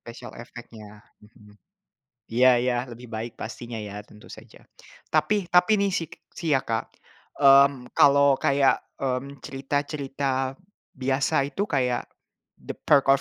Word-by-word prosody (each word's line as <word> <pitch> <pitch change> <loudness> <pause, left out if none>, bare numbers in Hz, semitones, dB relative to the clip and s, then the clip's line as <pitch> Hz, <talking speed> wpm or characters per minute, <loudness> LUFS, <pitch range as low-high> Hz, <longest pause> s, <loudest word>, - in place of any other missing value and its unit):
Special 115 0 -11
effect-nya, 105 -3 -13 0.2
mhm, 105 -1 -19 0.8
iya 125 +1 +5
iya 125 -1 +1 0.2
lebih 120 +1 -11
baik 110 +1 -5
pastinya 115 0 -7
ya 105 -1 -7
tentu 105 0 -17
saja - - -14 0.4
tapi 190 +5 +1
tapi 180 +4 +4
nih 200 - +2
sik 165 -4 -3 0.2
sih 165 -2 -3
ya, - - +3
Kak, 115 -1 -3 0.5
mmm, 135 -2 +5
kalau 140 0 +5
kayak, 140 -1 +2 0.2
mmm, 135 +1 -3
cerita 135 +2 -3
cerita 140 -2 -3 0.6
biasa 135 +1 0
itu 195 - -2
kayak, 125 -7 -1 0.5
The - - -7
Perks 140 -2 +3
135 Hz, 130 wpm, -25 LUFS, 120-140 Hz, 0.8 s, iya